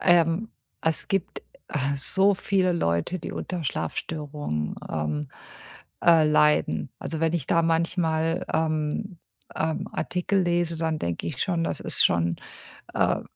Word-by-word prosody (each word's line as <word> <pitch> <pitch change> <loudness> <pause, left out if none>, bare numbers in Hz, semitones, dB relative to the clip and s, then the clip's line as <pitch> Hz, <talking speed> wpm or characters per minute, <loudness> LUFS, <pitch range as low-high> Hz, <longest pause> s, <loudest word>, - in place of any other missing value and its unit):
Ähm, 175 +4 +3 0.3
es 160 0 +2
gibt, 195 -3 -1 0.3
äh, 140 -1 -1
so 195 +9 +5
viele 185 -1 +1
Leute, 85 - 0
die 165 - -6
unter 175 -4 -4
Schlafstörungen, 145 - -3
ähm, 75 -2 -2 0.7
äh, 165 -2 +6
leiden. 150 - +2
Also, 160 - -4
wenn 165 0 +2
ich 165 -6 -2
da 170 - +3
manchmal, 165 0 +1
ähm, 160 +4 -1 0.4
ähm, 160 0 -1
Artikel 180 +2 0
lese, 175 -1 0
dann 160 -1 -1
denke 85 - -3
ich 145 -5 -2
schon, 170 -4 0
das - - -2
ist - - +2
schon, 85 0 +2 0.6
äh, - - +3
äh, - - -11
160 Hz, 140 wpm, -25 LUFS, 145-175 Hz, 0.7 s, äh